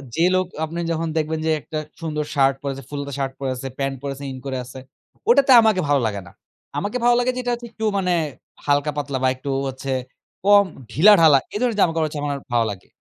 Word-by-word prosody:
যে 165 Hz, -, +2 dB
লোক 185 Hz, 0 st, +2 dB, 0.2 s
আপনি 165 Hz, +2 st, -7 dB
যখন 165 Hz, 0 st, -1 dB
দেখবেন 160 Hz, 0 st, -1 dB
যে, 160 Hz, -, +2 dB
একটা 155 Hz, -, -6 dB, 0.2 s
সুন্দর 150 Hz, -2 st, -2 dB
শার্ট 135 Hz, -1 st, +4 dB
পরে 140 Hz, -1 st, -2 dB
আছে, 135 Hz, -, -9 dB
ফুলহাতা 140 Hz, -1 st, -5 dB
শার্ট 135 Hz, -1 st, -2 dB
পরে 135 Hz, -1 st, -2 dB
আছে, 130 Hz, +2 st, -6 dB
প্যান্ট 135 Hz, -1 st, -1 dB
পরে 140 Hz, -1 st, -4 dB
আছে, 140 Hz, -, -10 dB
ইন 130 Hz, -, -7 dB
করে 135 Hz, -1 st, -3 dB
আছে 130 Hz, +1 st, -10 dB, 0.5 s
ওটাতে 280 Hz, -, +5 dB
আমাকে 215 Hz, -4 st, +3 dB
ভালো 145 Hz, -2 st, +3 dB
লাগে 100 Hz, -2 st, -4 dB
না। -, -, -13 dB, 0.5 s
আমাকে 205 Hz, +5 st, -2 dB
ভালো 240 Hz, 0 st, +5 dB
লাগে 245 Hz, +1 st, +1 dB
যে, -, -, -3 dB
এটা 245 Hz, -, -1 dB
হচ্ছে 240 Hz, 0 st, -6 dB
একটু 220 Hz, -, -4 dB
মানে 180 Hz, -2 st, +1 dB, 0.5 s
হালকা-পাতলা 145 Hz, -1 st, 0 dB
বা -, -, +4 dB
একটু 130 Hz, +2 st, -7 dB, 0.2 s
হচ্ছে 135 Hz, +1 st, -5 dB, 0.5 s
কম 205 Hz, 0 st, +7 dB, 0.3 s
ঢিলাঢালা, 165 Hz, -, +7 dB, 0.2 s
এ -, -, -7 dB
ধরনের 240 Hz, -4 st, 0 dB
জামা-কাপড় 165 Hz, -3 st, +2 dB
হচ্ছে, 150 Hz, -1 st, -6 dB
আমার 145 Hz, -1 st, -2 dB, 0.2 s
ভালো 115 Hz, -1 st, +3 dB
লাগে। 95 Hz, -3 st, -10 dB
150 Hz, 215 wpm, -22 LUFS, 135-185 Hz, 0.5 s, কম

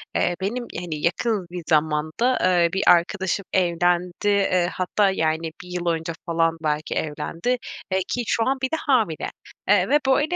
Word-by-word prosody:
eee, 175 Hz, -, +1 dB
benim, 240 Hz, +6 st, -2 dB
hani, 175 Hz, -3 st, -4 dB
yakın 190 Hz, +2 st, 0 dB
bir 175 Hz, -1 st, -6 dB
zamanda, 155 Hz, +10 st, +1 dB
eee, 175 Hz, -2 st, +3 dB
bir 195 Hz, -, 0 dB
arkadaşım 190 Hz, +2 st, +3 dB
evlendi. 175 Hz, 0 st, +2 dB
Eee, 195 Hz, -3 st, +2 dB
hatta, 195 Hz, +2 st, +1 dB
yani, 160 Hz, -2 st, -1 dB
1 -, -, -13 dB
yıl 180 Hz, -1 st, -4 dB
önce 165 Hz, 0 st, -1 dB
falan 165 Hz, -1 st, +1 dB
belki 150 Hz, 0 st, -1 dB
evlendi. 165 Hz, +10 st, -2 dB, 0.3 s
Eee, 190 Hz, -, +2 dB
ki 245 Hz, -, -2 dB
şu 230 Hz, -, +1 dB
an 270 Hz, +1 st, +1 dB
bir 260 Hz, -, -1 dB
de -, -, +1 dB
hamile. 225 Hz, -, +1 dB, 0.4 s
Eee, 195 Hz, -2 st, +4 dB
ve 295 Hz, +2 st, +5 dB
böyle, 295 Hz, +6 st, +2 dB
180 Hz, 170 wpm, -23 LUFS, 165-205 Hz, 0.4 s, ve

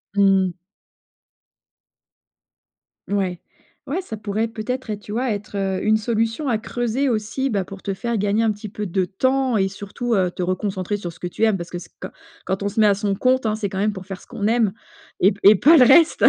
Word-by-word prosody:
Mmh 195 Hz, -2 st, +4 dB
mh. 180 Hz, 0 st, -8 dB, 2.5 s
Mouais, 190 Hz, -3 st, -1 dB, 0.5 s
ouais, 325 Hz, +8 st, -2 dB
ça 225 Hz, -12 st, -7 dB
pourrait, 215 Hz, +2 st, -2 dB
peut-être, 245 Hz, +3 st, -4 dB
être, 210 Hz, -1 st, -3 dB
tu 205 Hz, -, -8 dB
vois, 245 Hz, +2 st, 0 dB
être, 205 Hz, 0 st, -5 dB
heu, 190 Hz, -1 st, -1 dB
une 215 Hz, 0 st, +3 dB
solution 225 Hz, +5 st, -1 dB
à 230 Hz, -, +2 dB
creuser 240 Hz, +4 st, -1 dB
aussi, 235 Hz, +3 st, -1 dB
bah, 200 Hz, -5 st, 0 dB
pour 195 Hz, +1 st, -10 dB
te 195 Hz, -, -3 dB
faire 230 Hz, +4 st, -2 dB
gagner 205 Hz, +2 st, +1 dB
un 225 Hz, -, +3 dB
petit 210 Hz, +1 st, -7 dB
peu 210 Hz, +1 st, -5 dB
de 185 Hz, 0 st, 0 dB
temps 260 Hz, +6 st, +1 dB
et 195 Hz, -2 st, +2 dB
surtout, 205 Hz, +5 st, -4 dB
heu, 185 Hz, -4 st, +2 dB
te 180 Hz, -, -4 dB
reconcentrer 185 Hz, +2 st, -2 dB
sur 175 Hz, -4 st, -6 dB
ce -, -, -19 dB
que 180 Hz, -, -4 dB
tu 200 Hz, +5 st, 0 dB
aimes. 220 Hz, -2 st, +3 dB
Parce 170 Hz, -2 st, -6 dB
que 175 Hz, -, -5 dB
c'est -, -, -13 dB
qua -, -, -6 dB, 0.3 s
quand 190 Hz, +1 st, -2 dB
on -, -, 0 dB
se 215 Hz, +2 st, 0 dB
met -, -, +6 dB
à 205 Hz, -, +5 dB
son 200 Hz, -1 st, -1 dB
compte, 255 Hz, +4 st, +2 dB
hein, 215 Hz, -1 st, +1 dB
c'est 215 Hz, -2 st, -3 dB
quand 190 Hz, -, -6 dB
même, 210 Hz, +2 st, +1 dB
pour 190 Hz, -2 st, -8 dB
faire 190 Hz, -1 st, -7 dB
ce -, -, -18 dB
qu'on 205 Hz, -, -4 dB
aime 225 Hz, -3 st, +2 dB, 0.5 s
et 190 Hz, -, +6 dB
p 195 Hz, -, -9 dB
et 215 Hz, -, +7 dB
pas 300 Hz, -, +6 dB
le 255 Hz, -, +8 dB
reste! 320 Hz, +6 st, +5 dB
210 Hz, 230 wpm, -22 LUFS, 195-230 Hz, 2.5 s, le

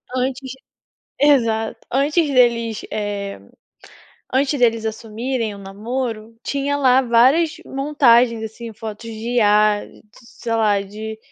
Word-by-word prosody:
Antes 260 Hz, +1 st, -2 dB, 0.7 s
exato. 230 Hz, -6 st, +2 dB
Antes 295 Hz, +5 st, +2 dB
deles, 235 Hz, -4 st, +2 dB
eh, 205 Hz, -, -4 dB, 0.9 s
antes 275 Hz, +2 st, +1 dB
deles 230 Hz, -2 st, +2 dB
assumirem 225 Hz, +1 st, -3 dB
o -, -, -11 dB
namoro, 220 Hz, +3 st, -5 dB
tinha 280 Hz, 0 st, -1 dB
lá 260 Hz, -2 st, +4 dB
várias 265 Hz, +7 st, +3 dB
montagens, 250 Hz, -5 st, +3 dB
assim, 225 Hz, +1 st, -8 dB
fotos 220 Hz, +1 st, -8 dB
de 225 Hz, +2 st, -5 dB
IA, 210 Hz, -1 st, +3 dB, 0.3 s
sei 235 Hz, -1 st, -9 dB
lá 210 Hz, -3 st, +2 dB
de 215 Hz, +2 st, -7 dB
230 Hz, 110 wpm, -20 LUFS, 220-265 Hz, 0.9 s, lá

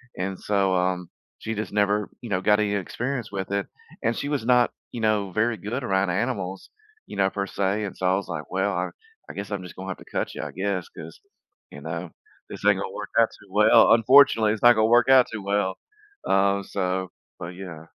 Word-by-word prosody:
and 95 Hz, +1 st, -4 dB
so, 100 Hz, -2 st, +1 dB
um, 90 Hz, -1 st, -1 dB, 0.3 s
she 115 Hz, 0 st, -4 dB
just 105 Hz, 0 st, -5 dB
never, 105 Hz, 0 st, +1 dB
you 120 Hz, -, -8 dB
know, 95 Hz, -2 st, 0 dB
got 105 Hz, +2 st, +3 dB
any 105 Hz, -1 st, 0 dB
experience 120 Hz, +4 st, -3 dB
with 95 Hz, 0 st, -4 dB
it. 100 Hz, 0 st, 0 dB, 0.4 s
And 115 Hz, +1 st, 0 dB
she 145 Hz, -, -3 dB
was 140 Hz, -6 st, -2 dB
not, 125 Hz, -1 st, +4 dB, 0.2 s
you 120 Hz, -, -5 dB
know, 105 Hz, -3 st, +1 dB
very 115 Hz, +2 st, +1 dB
good 115 Hz, +8 st, -4 dB
around 95 Hz, -3 st, +1 dB
animals, 95 Hz, -2 st, -3 dB, 0.4 s
you -, -, -9 dB
know, 95 Hz, -1 st, +3 dB
per 100 Hz, 0 st, -3 dB
se. 100 Hz, +3 st, -1 dB
and 100 Hz, -, -5 dB
so, 95 Hz, -, -3 dB
I 95 Hz, -, +3 dB
was 100 Hz, -, -3 dB
like, 75 Hz, -3 st, -4 dB
"Well, 95 Hz, +2 st, 0 dB
I 90 Hz, -, -2 dB, 0.4 s
I -, -, -7 dB
guess 100 Hz, 0 st, -6 dB
I'm 100 Hz, -2 st, -3 dB
just 90 Hz, -, -10 dB
gonna 95 Hz, +1 st, -7 dB
have 95 Hz, -, -4 dB
to -, -, -15 dB
cut -, -, -2 dB
ya, -, -, -4 dB
I -, -, -9 dB
guess, 95 Hz, -1 st, -2 dB
'cause, 80 Hz, 0 st, -11 dB, 0.5 s
you 70 Hz, -, -10 dB
know, 85 Hz, +2 st, -5 dB, 0.4 s
this -, -, -9 dB
ain't -, -, +5 dB
gonna -, -, -4 dB
work -, -, -6 dB
out -, -, +5 dB
too -, -, -18 dB
well. -, -, +6 dB
Unfortunately, 115 Hz, -2 st, +6 dB
it's 110 Hz, -, -6 dB
not 120 Hz, 0 st, +9 dB
gonna 110 Hz, 0 st, +3 dB
work 120 Hz, +2 st, +4 dB
out 130 Hz, -2 st, +7 dB
too 105 Hz, -3 st, -5 dB
well." 100 Hz, -1 st, 0 dB, 0.5 s
Um, 100 Hz, 0 st, +2 dB
so 95 Hz, -2 st, -2 dB, 0.3 s
but 85 Hz, -, -6 dB
yeah. 85 Hz, -4 st, -9 dB
100 Hz, 225 wpm, -25 LUFS, 95-110 Hz, 0.5 s, not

